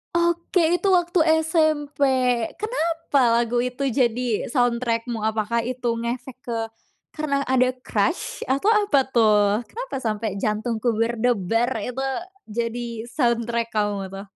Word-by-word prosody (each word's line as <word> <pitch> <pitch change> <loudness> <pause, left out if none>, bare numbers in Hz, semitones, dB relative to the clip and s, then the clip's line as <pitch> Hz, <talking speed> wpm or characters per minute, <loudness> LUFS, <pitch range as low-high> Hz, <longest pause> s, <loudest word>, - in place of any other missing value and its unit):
Oke, 340 0 +2
itu 395 - -2
waktu 350 -1 +2 0.2
SMP 310 -2 0 0.6
kenapa 330 - 0
lagu 235 +1 +1
itu 250 +2 -5
jadi 240 -2 0
soundtrack 240 -2 0
mu? 220 -2 -3
Apakah 220 +1 0
itu 250 -1 -2
ngefek 240 +2 -4
ke 235 - -3 0.6
karena 280 -2 0
ada 255 0 +3
crush? 240 - -1
atau 275 +10 +1
apa 420 -7 +3
tuh? 215 -1 +3
Kenapa - - -6
sampe 215 0 -1 0.2
jantungku 225 +2 0 0.2
debar 230 0 +1
itu 250 +4 -4 0.4
jadi 235 +1 -4
soundtrack 235 -3 0
kamu 205 -2 0
tuh? 195 +1 -7
240 Hz, 120 wpm, -23 LUFS, 225-295 Hz, 0.6 s, ada